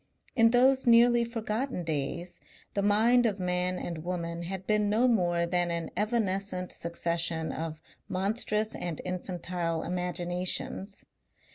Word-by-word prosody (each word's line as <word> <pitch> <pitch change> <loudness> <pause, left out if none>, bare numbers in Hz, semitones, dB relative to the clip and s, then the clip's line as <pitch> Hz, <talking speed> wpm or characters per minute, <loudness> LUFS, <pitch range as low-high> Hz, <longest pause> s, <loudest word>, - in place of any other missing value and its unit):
In 230 -2 +6
those 260 +2 +4
nearly 235 0 +6
forgotten 230 -1 -3
days 165 +3 -3 0.3
the 200 - 0
mind 225 +4 +4
of 205 -2 -2
man 180 0 0
and 170 -3 -4
woman 170 -1 -3
had 190 +2 -5
been 210 0 +2
no 225 +4 +3
more 175 -7 +2
than 175 0 +1
an 170 -1 -3
evanescent 200 -4 -1
succession 170 -1 -1
of 160 -1 -5 0.3
monstrous 210 +3 0
and 170 -3 -4
infantile 180 -2 -3
imaginations. 180 +2 -3
185 Hz, 125 wpm, -29 LUFS, 170-215 Hz, 0.3 s, In